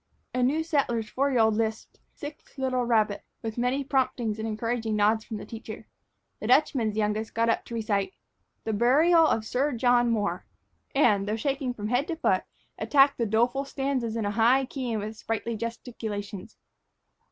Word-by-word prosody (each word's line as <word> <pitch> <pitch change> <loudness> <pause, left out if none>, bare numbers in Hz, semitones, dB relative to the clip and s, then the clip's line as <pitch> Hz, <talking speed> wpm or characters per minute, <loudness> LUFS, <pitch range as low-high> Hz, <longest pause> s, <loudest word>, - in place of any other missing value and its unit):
A 255 - 0
new 290 +6 +2
settler's 240 -9 0
four 275 +2 +1
year 250 -4 +3
old 220 0 +4
lisped 220 0 -3 0.2
"Six 290 0 -10
Little 255 -2 0
Rabbits," 215 -3 +2 0.2
with 225 +1 -4
many 255 +3 +1
promptings 255 -5 0
and 220 - -2
encouraging 225 0 -2
nods 215 +1 +3
from 220 - -6
the - - -8
teacher. 220 -1 -8 0.5
The 215 - -4
Dutchman's 250 -5 +3
youngest 215 +1 -1
got 230 0 +2
up 230 - 0
to 235 - -7
recite 215 - -1 0.5
"The 220 - -2
Burial 310 +9 +5
of 220 -6 0
Sir 270 +5 0
John 245 0 +3
Moore," 210 -3 -1 0.5
and, 210 -8 +3
though 210 - 0
shaking 270 +1 -2
from 210 -1 -4
head 250 +4 +1
to 335 - -2
foot, 320 - +1 0.3
attacked 280 -1 +4
the 230 - +1
doleful 240 +6 +1
stanzas 270 -4 -2
in 225 -2 -1
a 205 - 0
high 235 +5 +4
key 255 -2 -4
and 215 -2 -2
with 215 +1 -6
sprightly 225 +1 -3
gesticulations. 220 -3 -6
230 Hz, 175 wpm, -27 LUFS, 220-265 Hz, 0.5 s, Burial